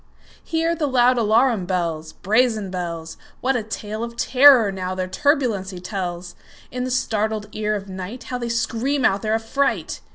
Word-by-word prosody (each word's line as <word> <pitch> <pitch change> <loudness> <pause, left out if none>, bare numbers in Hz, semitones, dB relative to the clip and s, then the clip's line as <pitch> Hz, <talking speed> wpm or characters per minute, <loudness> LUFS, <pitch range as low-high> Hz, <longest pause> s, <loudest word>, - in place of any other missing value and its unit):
Hear 330 0 0
the 315 -3 -1
loud 250 -1 +3
alarum 220 -2 +2
bells, 165 -4 -2
Brazen 215 -1 +1
bells! 170 -3 -5 0.2
What 265 +1 0
a 245 - 0
tale 215 0 -5
of 235 0 -7
terror, 255 -6 +6
now, 185 -1 -4
their 185 0 -2
turbulency 215 - 0
tells! 180 -2 -5 0.4
In 250 0 -3
the - - -3
startled 220 -4 -1
ear 215 -1 -1
of 200 -1 -5
nightHow 200 +7 -6
they 235 -1 -3
scream 240 +4 0
out 195 +1 +2
their 220 0 0
affright! 225 +5 -1
220 Hz, 160 wpm, -22 LUFS, 190-250 Hz, 0.4 s, terror